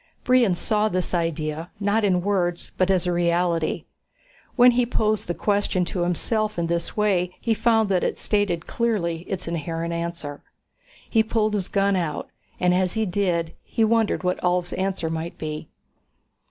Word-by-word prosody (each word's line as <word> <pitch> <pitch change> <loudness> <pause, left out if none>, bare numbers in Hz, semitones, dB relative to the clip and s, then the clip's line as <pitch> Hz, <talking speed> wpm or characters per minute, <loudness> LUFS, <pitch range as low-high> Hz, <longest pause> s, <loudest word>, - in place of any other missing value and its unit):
Brion 245 -7 +4
saw 215 +4 +1
this 185 -2 -2
idea, 165 -1 -2
not 205 +2 +1
in 180 -3 +2
words 180 -3 -1
but 185 0 +1
as 185 -2 +2
a 180 - +1
reality. 170 -1 +1 0.7
When 245 0 +7
he 245 +1 +2
posed 215 -3 0
the 175 - -2
question 200 -3 +1
to 175 +1 -3
himself 215 +5 0
in 170 - 0
this 170 +3 -2
way 185 -4 +1
he 230 - +1
found 225 -1 +3
that 185 -2 +2
it - - -1
stated 200 -5 0
clearly 200 -8 -1
its 185 -3 -3
inherent 165 0 -3
answer. 170 -4 -4 0.7
He 225 - +3
pulled 220 -1 0
his 200 -3 -1
gun 200 0 +2
out, 165 -5 -2 0.3
and 180 -1 +3
as 185 +1 +1
he 220 0 +1
did 175 -4 0
he 225 - 0
wondered 225 -3 +2
what 180 0 0
Ulv's 180 0 0
answer 190 -4 -2
might 165 +1 -4
be. 155 0 -5
180 Hz, 165 wpm, -24 LUFS, 170-210 Hz, 0.7 s, When